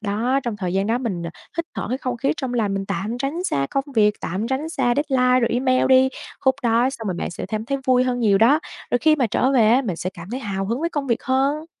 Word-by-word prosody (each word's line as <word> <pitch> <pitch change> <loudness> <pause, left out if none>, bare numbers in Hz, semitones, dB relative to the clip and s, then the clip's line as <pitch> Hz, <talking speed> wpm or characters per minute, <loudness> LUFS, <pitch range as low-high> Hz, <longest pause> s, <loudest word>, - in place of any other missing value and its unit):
đó. 230 +6 0
Trong 235 -4 -3
thời 180 -3 -3
gian 195 +1 +1
đó 230 +2 +1
mình, 200 -9 -3
ờ, 170 - -4 0.3
hít 335 - -1
thở - - -3
cái 255 +3 -2
không 255 -2 -3
khí 270 +3 0
trong 260 -5 -3
lành, 210 -4 0
mình 195 0 -3
tạm 210 +4 -3
tránh 275 +6 -2
ra 140 0 0
công 275 0 0
việc, 210 -1 +4
tạm 195 +6 -3
tránh 275 +4 -2
xa 250 -7 +1
deadline 255 -3 +3
rồi 235 - +2
email 255 +1 +2
đi. 260 0 +6 0.3
Khúc 265 -1 +3
đó 235 +2 +3
xong 225 -5 -7
rồi 185 - -1
bạn - - -3
sẽ - - -6
cảm 215 0 -3
thấy 275 +3 -2
vui 255 0 +4
hơn 250 -1 -1
nhiều 205 -3 +4
đó. 270 +9 +5 0.3
Rồi 245 - +2
khi 310 +4 +4
mà 255 - +2
trở 260 +5 +1
về 225 -5 +4
á, 255 +4 +4
mình 190 -8 -3
sẽ 185 - -3
cảm 175 +3 -10
thấy 255 +2 -4
hào 195 -4 -3
hứng 235 +6 -2
với 335 - 0
công 285 -2 -3
việc 235 0 0
hơn. 275 +4 0
245 Hz, 280 wpm, -22 LUFS, 210-265 Hz, 0.3 s, đi